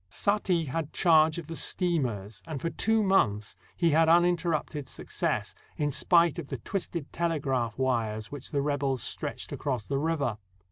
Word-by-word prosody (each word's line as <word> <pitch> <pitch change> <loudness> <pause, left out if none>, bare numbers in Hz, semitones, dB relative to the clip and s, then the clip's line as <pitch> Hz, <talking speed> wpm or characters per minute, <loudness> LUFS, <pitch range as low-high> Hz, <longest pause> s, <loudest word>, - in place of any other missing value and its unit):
Saati 185 - +1
had 155 +2 -3
charge 160 -2 +4
of 170 - -5
the 165 +2 -7
steamers, 120 - -1
and 155 -4 -4
for 165 - -2
two 220 0 +2
months 105 - +2 0.2
he 170 -2 +2
had 160 +2 +4
uninterrupted 170 -4 +2
success, - - -2 0.2
in 145 -1 0
spite 170 +3 +3
of 155 - -6
the 135 - -4
twisted 170 - -4
tele 170 -2 0
graph 125 -6 -1
wires 115 -5 -1
which 145 -2 -8
the 140 -2 0
rebels 140 -4 0
stretched - - -4
across 130 -6 -2
the 135 +5 -2
river. 145 -8 -1
150 Hz, 160 wpm, -28 LUFS, 130-170 Hz, 0.2 s, charge